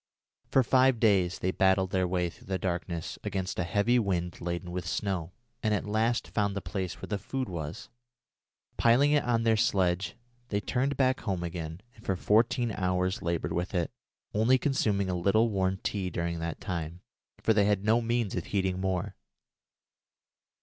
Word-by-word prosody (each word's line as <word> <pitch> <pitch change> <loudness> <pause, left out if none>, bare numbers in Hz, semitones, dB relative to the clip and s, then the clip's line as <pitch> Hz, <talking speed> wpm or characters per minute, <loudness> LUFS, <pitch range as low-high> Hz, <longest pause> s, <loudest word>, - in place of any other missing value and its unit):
For 135 - +4
five 130 0 +4
days 95 -5 +3
they 95 - 0
battled 95 0 +2
their 95 -1 +1
way 90 -1 0
through - - -18
the 95 -1 -1
darkness 85 -2 -3
against 95 -1 -3
a - - +2
heavy 100 +8 +2
wind 90 -5 -1
laden 85 +1 -3
with 90 -1 -4
snow, 90 -2 -2 0.3
and 110 -1 +2
at - - -2
last 110 +3 0
found 100 -2 0
the - - -1
place 90 0 -4
where - - -7
the 105 - -2
food 130 +5 -3
was. 85 +2 -5 0.9
Piling 125 +5 +5
it 150 -1 +3
on 115 -2 +1
their 115 -1 +4
sledge, 90 -4 +1 0.3
they 100 - 0
turned 130 +7 -1
back 130 -1 +2
home 95 -5 -2
again, 85 0 -5
and 110 - -17
for 95 - 0
fourteen 115 +5 +2
hours 90 -1 0
laboured 85 -1 -1
with 90 +3 -2
it, 85 -2 0 0.4
only 110 +5 +4
consuming 105 -8 +1
a 90 - -1
little 100 +6 +2
warm 95 -1 +1
tea 95 -3 -1
during 85 -1 -2
that 85 0 -4
time, 85 -1 -4 0.4
for 110 - +3
they 105 -2 +4
had 105 -1 +1
no 115 +2 +4
means 115 -3 0
of 90 - -3
heating 95 -2 -1
more. 95 -2 -1
95 Hz, 175 wpm, -29 LUFS, 90-110 Hz, 0.9 s, Piling